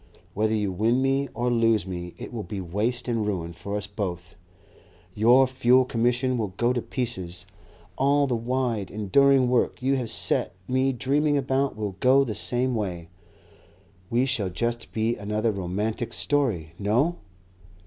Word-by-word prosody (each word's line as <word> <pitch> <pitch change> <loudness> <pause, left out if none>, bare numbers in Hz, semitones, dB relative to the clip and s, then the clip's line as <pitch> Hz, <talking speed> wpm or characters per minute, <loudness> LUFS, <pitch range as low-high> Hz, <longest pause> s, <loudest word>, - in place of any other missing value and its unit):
Whether 110 +2 +1
you 105 -3 0
win 110 +7 +1
me 135 0 +1
or 120 0 0
lose 115 -4 +2
me 90 -2 -6
it - - -8
will 115 - -3
be 100 +1 -6
waste 105 +8 -2
and 115 -3 0
ruin 90 -5 -3
for 100 +4 -5
us 105 - -3
both. 95 -3 -5 0.8
Your 120 +6 +5
Fuel 130 0 +3
Commission 125 +1 0
will 100 -5 -3
go 120 +1 +2
to 120 - -1
pieces, 95 -10 -4 0.5
all 140 +2 +3
the 130 -3 0
wide, 115 -4 -1
enduring 130 +6 +3
work 125 -1 +1
you 135 +2 +1
have 120 -3 -3
set 85 - -1
me 130 +1 +2
dreaming 145 +4 +1
about 135 0 0
will 105 -3 -4
go 135 +2 +5
the 115 -5 -3
same 125 +4 0
way. 90 -7 -3 1.0
We 120 +2 +2
shall 115 -8 0
just 120 +7 -3
be 110 +1 0
another 105 +2 -1
romantic 105 +4 -3
story.... 110 - 0
No!" 125 +12 +1
115 Hz, 160 wpm, -25 LUFS, 100-130 Hz, 1.0 s, Your